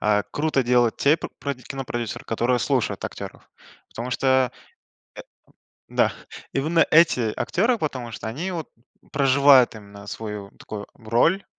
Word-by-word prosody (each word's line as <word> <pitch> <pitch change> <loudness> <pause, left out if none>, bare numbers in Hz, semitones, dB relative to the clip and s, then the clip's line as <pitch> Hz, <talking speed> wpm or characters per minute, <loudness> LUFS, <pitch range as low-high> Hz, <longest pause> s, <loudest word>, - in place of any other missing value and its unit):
а 105 -1 +2
круто 145 -3 +1
делают 120 -1 +3
те 145 +3 +4
п - - -6
про 140 0 -2
кинопродюсеры, 125 -3 -5
которые 120 +2 +1
слушают 130 -1 0
актеров. - - -8 0.4
Потому 120 +2 -6
что, 130 -1 +2
э, - - -21 1.3
да, - - +2 0.4
именно 160 +5 +3
эти 140 -9 +4
актеры, 220 - +1
потому 130 - -3
что 105 +1 -6
они 155 +12 -4
вот 165 -4 -5 0.4
проживают 140 -2 +5
именно 100 -1 -12
свою 105 -1 -6
такую 105 -1 -7
роль, 120 - +1
125 Hz, 135 wpm, -24 LUFS, 115-145 Hz, 1.3 s, проживают